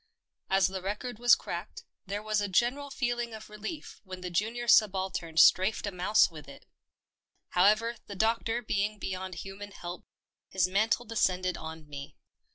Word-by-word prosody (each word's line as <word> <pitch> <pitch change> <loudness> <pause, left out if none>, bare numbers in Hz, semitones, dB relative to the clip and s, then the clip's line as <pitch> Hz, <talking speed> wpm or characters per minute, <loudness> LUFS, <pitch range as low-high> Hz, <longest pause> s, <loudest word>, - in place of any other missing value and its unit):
As 190 -1 +4
the 190 +1 -2
record 210 +5 -4
was 240 0 +7
cracked, - - -7 0.2
there 205 +2 -3
was 215 -1 0
a 205 - -1
general 245 +9 +1
feeling 240 -4 -2
of 220 -1 -11
relief 220 +10 -7
when 185 -2 -8
the 180 -1 -5
junior 230 +7 -1
subaltern 190 -7 +2
strafed 190 +8 +5
a 200 - -2
mouse 185 +2 +3
with 150 -4 -11
it. 140 - -13 0.8
However, 215 +6 +3
the 200 - -7
doctor 225 +3 0
being 210 0 -1
beyond 185 -2 -5
human 195 +3 -8
help, 175 -3 -8 0.4
his 185 -1 +2
mantle 215 +5 +1
descended 185 -5 0
on 160 -1 -8
me. 140 -1 -8
200 Hz, 160 wpm, -29 LUFS, 185-225 Hz, 0.8 s, was